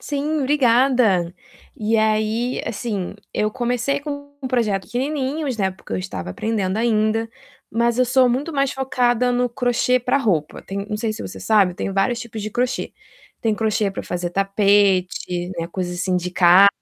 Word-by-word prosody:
Sim, 300 +2 -2
obrigada. 250 - +3 0.4
E 220 +1 +1
aí, 220 +3 +1
assim, 205 -4 -3 0.2
eu 215 - 0
comecei 245 +4 -1
com 285 -1 -7 0.2
projetos 220 -6 0
pequenininhos, 275 0 -2
né, 190 -2 +1
porque 185 - -11
eu - - 0
estava 90 -1 -5
aprendendo 205 - -1
ainda, 225 0 +1 0.4
mas 235 +2 +1
eu 255 - +5
sou 255 0 +4
muito 280 +7 -1
mais 275 -1 +1
focada 250 -2 +1
no 245 0 +1
crochê 245 +1 +1
pra 250 +3 +1
roupa. 175 - -1
Tem 200 +1 -5
não 210 - -2
sei 220 0 -1
se 215 - -7
você - - -8
sabe, 200 -5 +3
tem 195 - -3
vários 230 +5 +1
tipos 225 -3 -7
de 215 - -4
crochê. 250 +3 -1 0.5
Tem 225 -2 +1
crochê 215 -1 0
pra 195 - -6
fazer 175 -1 -3
tapete, 195 -2 +1
né, 165 - -2
coisa 180 0 -3
assim 180 +1 -1
de 180 0 -2
casa, 180 +2 +7
220 Hz, 170 wpm, -21 LUFS, 195-250 Hz, 0.5 s, casa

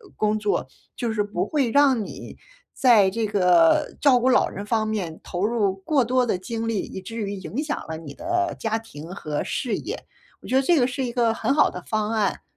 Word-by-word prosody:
工 215 0 +1
作， 210 -1 -1 0.3
就 235 -3 -2
是 210 -1 +1
不 205 -3 -2
会 280 -6 0
让 270 -5 +4
你 - - -9 0.4
在 225 -7 +5
这 225 +2 -1
个 180 -5 +3
照 270 -4 +5
顾 250 +2 +2
老 255 - +4
人 200 - -7
方 215 0 0
面 185 -7 -3
投 180 +3 -2
入 210 -4 +1
过 265 +8 +1
多 255 +1 +2
的 220 - 0
精 225 +4 -4
力， 225 -3 0
以 - - -7
至 225 +5 -9
于 205 -3 -3
影 195 - -4
响 300 -1 -3
了 160 - -5
你 155 -3 -9
的 345 +1 -1
家 225 -1 -1
庭 170 -7 -10
和 150 -5 -3
事 235 -6 -2
业。 425 +8 -6 0.4
我 - - -12
觉 255 - 0
得 265 - +5
这 340 +4 +4
个 245 - +4
是 260 +1 -3
一 240 - -3
个 235 -2 +2
很 270 - 0
好 300 - +4
的 - - -7
方 215 -1 -1
案。 215 -4 0
225 Hz, 240 characters per minute, -24 LUFS, 195-255 Hz, 0.4 s, 在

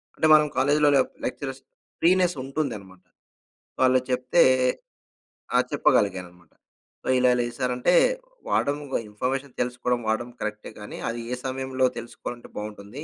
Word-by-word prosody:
అంటే 160 - +2
మనం 150 -1 +6
కాలేజిలో 145 +2 +4 0.4
లెక్చరర్స్ 135 +1 -4 0.4
ఫ్రీనెస్ 180 0 +3
ఉంటుందన్నమాట. 110 -10 -5 0.8
వాళ్ళు 130 0 +5
చెప్తే 125 +6 +3 1.1
ఆ! - - +7
చెప్పగలిగానన్నమాట. 90 -4 0 0.5
సో, - - -10
ఇలా 125 0 +4
ఇలా 120 - +1
ఇది 120 - -8
సారు 125 -1 0
అంటే 175 +8 +2 0.6
"వాడం, 145 +1 +1 0.3
ఇన్‌ఫర్మేషన్ 130 +5 -3
తెలుసుకోవడం, 125 0 -1
వాడం 120 +2 -1
కరెక్టే 105 0 -5
కానీ 105 - -8
అది 120 0 -4
ఏ - - 0
సమయంలో 130 0 -1
తెలుసుకోవాలంటే 120 +1 -8
బావుంటుంది. 105 +6 -7
125 Hz, 125 wpm, -25 LUFS, 110-135 Hz, 1.1 s, ఆ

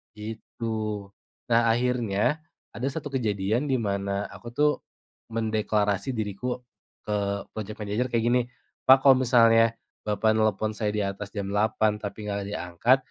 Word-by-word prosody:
Gitu. 110 -1 -5 0.4
Nah, 115 - +6
akhirnya 120 +2 +1 0.3
ada 130 +3 -3
satu 145 0 -4
kejadian 110 +1 0
di 135 - +2
mana 100 -3 -1
aku - - -11
tuh 150 +2 +4 0.6
mendeklarasi 110 +1 0
diriku 110 +4 -3 0.4
ke 100 -1 -1
project 110 0 -6
manager 105 +4 -1
kayak 115 -2 0
gini, 120 +1 +3 0.5
"Pak, 130 0 +8
kalau 135 -2 +7
misalnya 115 -2 +5 0.3
Bapak 110 +1 +2
nelpon 110 0 +1
saya 105 -1 -1
di 105 - +1
atas 100 +1 -4
jam 100 -1 -3
8.00 110 0 +2
tapi 105 +1 -6
enggak 100 -1 -2
ada 100 - -4 0.2
angkat 120 +10 +4
110 Hz, 140 wpm, -26 LUFS, 105-120 Hz, 0.6 s, Pak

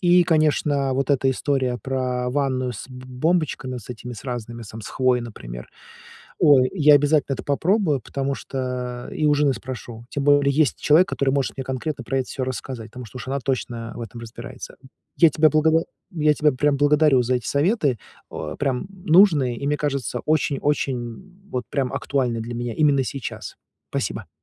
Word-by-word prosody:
И, 175 0 +5
конечно, 150 -4 +2
вот 135 +1 0
эта 135 -1 +2
история 130 -2 0
про 125 -2 -1
ванную 130 -2 0
с 110 - -8
б 125 -1 -10
бомбочками, 130 -1 -1
с 120 0 -9
этими 125 +1 -7
разными, 120 -2 -5
сам 110 +1 -9
с - - -8
хвоей, 130 -1 +2
например. - - -9 0.7
Ой, 130 -3 +6
я 150 -4 +6
обязательно 145 -1 +3
это - - -7
попробую, 160 0 +1
потому 135 +3 -3
что 125 -2 -4
и 155 - -2
у 150 - +5
жены 145 -2 +2
спрошу. 120 -2 -8
Тем 140 -1 -2
более, 145 -1 +4
есть 150 -1 +2
человек, 170 +6 +4
который 140 -7 0
может 135 -1 -1
мне 135 - -4
конкретно 130 +1 -4
про 135 +4 -1
это 130 - -2
всё 130 - -3
рассказать, 125 -2 -5
потому 125 +1 -9
что 110 - -13
уж 125 - -7
она 135 +1 -1
точно 120 -3 -3
в - - -7
этом 115 +1 -8
разбирается, 125 +3 -9
м. 130 - -15 0.3
Я 165 - +7
тебя 155 +1 +3
за - - -4
благово 160 +2 +3 0.3
я 150 -2 +3
тебя 150 0 +3
прям 145 +2 +1
благодарю 145 -2 +4
за 125 +1 +1
эти 120 - -6
советы, 145 - +1 0.3
а, 75 - -5
прям 135 +2 -1
нужные 175 -8 +4
и, 140 - -5
мне 150 +1 +1
кажется, 140 -3 -2
очень-очень, 145 -3 +1
м 185 - -10
вот 125 -2 -2
прям 135 -3 -1
актуальны 125 -5 -1
для 115 +2 -5
меня 120 -1 -3
именно 145 -3 +3
сейчас. 135 -1 -6 0.3
Спасибо. - - -3
135 Hz, 185 wpm, -23 LUFS, 125-150 Hz, 0.7 s, Я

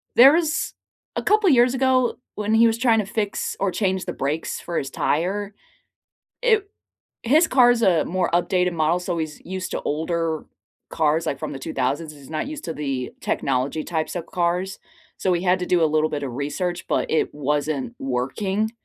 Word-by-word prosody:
there 260 +5 +9
was 325 -1 0 0.4
a - - -2
couple 425 -2 +4
years 250 -3 +5
ago, 260 -2 +2 0.2
when 210 +1 -1
he 230 +1 +6
was 225 0 +1
trying 230 -2 +3
to 210 - -1
fix 205 0 -2
or 200 - +1
change 190 -1 -1
the - - -4
brakes 145 +4 -2
for 170 - -4
his 135 - -2
tire, 195 +6 -1 0.9
it 440 -5 +3 0.6
his 305 +8 +4
car 250 -2 +5
is 240 -1 +1
a 170 -6 +4
more 180 +1 0
updated 180 +1 +2
model, 160 +2 +1
so 175 -1 -3
he's 155 -2 -4
used 185 0 -4
to - - -2
older 160 +1 -1 0.5
cars, 160 +1 +1
like 140 - -1
from - - -4
the 135 - -6
2000s, 150 +1 -2
he's 140 -2 -14
not 155 - -2
used 300 0 -7
to 165 - -3
the 135 -4 -3
technology-types 155 +6 -1
of 170 -2 -3
cars, 180 +2 -1 0.4
so - - -1
we 175 0 0
had 185 0 +3
to 180 - -2
do 175 -2 +3
a - - +6
little 155 0 +2
bit 145 -1 -3
of 130 -3 -4
research, 170 +6 -3
but - - 0
it 160 - +1
wasn't 145 -3 -1
working. 190 - -1
175 Hz, 190 wpm, -23 LUFS, 155-220 Hz, 0.9 s, there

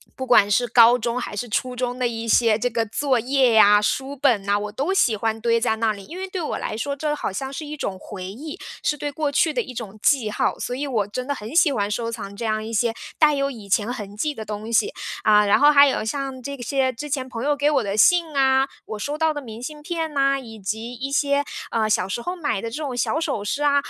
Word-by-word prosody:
不 260 - -5
管 215 -5 +5
是 245 +5 +2
高 235 +1 +6
中 235 +1 -2
还 - - -6
是 245 +4 -3
初 250 +3 -2
中 250 0 -2
的 255 - -1
一 230 0 -5
些 225 -1 +4
这 245 - 0
个 230 -1 -1
作 255 +4 0
业 260 0 +3
呀， 210 -1 +7
书 270 +6 -1
本 250 -7 +2
呐， 200 +1 +1
我 210 0 -5
都 275 - -1
喜 245 - +3
欢 220 +1 -2
堆 230 0 +1
在 220 -2 +1
那 225 -1 +1
里。 200 -1 -10
因 340 - -9
为 380 +1 -4
对 370 -2 -4
我 305 - -3
来 - - -4
说， 255 +6 -2
这 295 +1 -1
好 295 - -3
像 265 +8 -5
是 305 - -5
一 300 +1 -7
种 195 -7 -3
回 185 -2 -8
忆， 290 - -8 0.2
是 295 - 0
对 290 +1 -3
过 295 0 -2
去 305 +2 +2
的 250 - 0
一 250 - -8
种 215 -4 -7
记 260 -7 +3
号， - - 0
所 245 - -3
以 285 +3 -3
我 220 -7 0
真 250 +5 -5
的 285 - 0
很 220 +7 -8
喜 335 -3 +5
欢 205 -6 -1
收 230 +2 -2
藏 200 -3 -7
这 235 - -6
样 215 -1 0
一 225 - -6
些 230 +1 +1 0.3
带 305 -1 +5
有 275 0 0
以 215 -6 -11
前 210 +4 +1
痕 205 -4 -8
迹 300 +7 -1
的 225 - -7
东 215 +1 -6
西。 420 - +2 0.3
啊， 210 -1 +5
然 200 - +4
后 290 +1 +7
还 285 -1 +7
有 265 - 0
像 265 +2 -4
这 280 +1 -5
些 260 +1 0
之 290 +5 -7
前 260 -2 -2
朋 235 -1 -5
友 295 0 +2
给 285 +1 +2
我 275 -4 +2
的 200 -1 -2
信 340 - +5
啊， 265 0 +3 0.2
我 215 - -6
收 290 +7 -3
到 320 0 +2
的 295 - -4
明 225 -2 -9
信 300 +2 -7
片 320 -1 -4
啊， 275 0 +3
以 225 -4 -11
及 220 +5 -4
一 260 +3 -5
些， 280 0 +2 0.3
呃， 220 -1 +1
小 190 -3 +1
时 235 - -3
候 355 +8 -4
买 290 - -2
的 230 - -4
这 - - -5
种 265 -4 -4
小 305 - 0
首 285 -11 -2
饰 290 +8 -2
啊， 285 -1 +3
245 Hz, 290 characters per minute, -23 LUFS, 220-285 Hz, 0.3 s, 呀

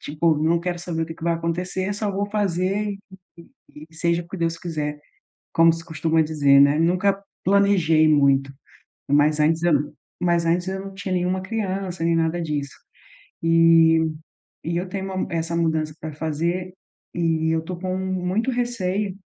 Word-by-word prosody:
tipo, 155 +2 0
não 160 +2 +2
quero 175 0 -3
saber 170 -2 -3
o - - -3
que 160 - -7
que - - -16
vai 170 -1 +2
acontecer, 180 +4 -2
só 205 0 -2
vou 200 +1 -2
fazer 200 0 0
e 200 -1 -5 0.7
e 150 +1 -13
e 160 - -21
seja 170 +1 0
o - - -17
que 190 - -7
Deus 165 0 -1
quiser, 150 -4 -4 0.5
como 165 0 +5
se 165 0 -7
costuma 160 0 +1
dizer, 145 -3 +3
né, 140 +2 +5
nunca 185 +4 +1 0.2
planejei 185 -5 +4
muito. 140 -2 +3 0.6
Mas 150 +1 +3
antes 160 +2 +2
eu 175 -3 +3
não 145 +1 0 0.3
mas 170 -1 +2
antes 175 +2 +1
eu 190 0 -3
não 195 0 -9
tinha 195 0 -6
nenhuma 180 +1 0
criança 190 -4 -3
nem 165 0 +2
nada 165 +1 0
disso 145 -3 -3 0.7
e 165 0 +5 0.6
e 170 +1 -2
eu 180 +1 -3
tenho 190 +1 -4
uma 185 - -2
essa 165 0 -2
mudança 160 -2 0
pra 155 -1 -6
fazer 170 +4 -2 0.4
e 165 -2 0
eu 160 - 0
tô 180 +2 -5
com 185 +1 -3
muito 190 +5 -1
receio, 210 -5 -2
170 Hz, 175 wpm, -23 LUFS, 160-185 Hz, 0.7 s, como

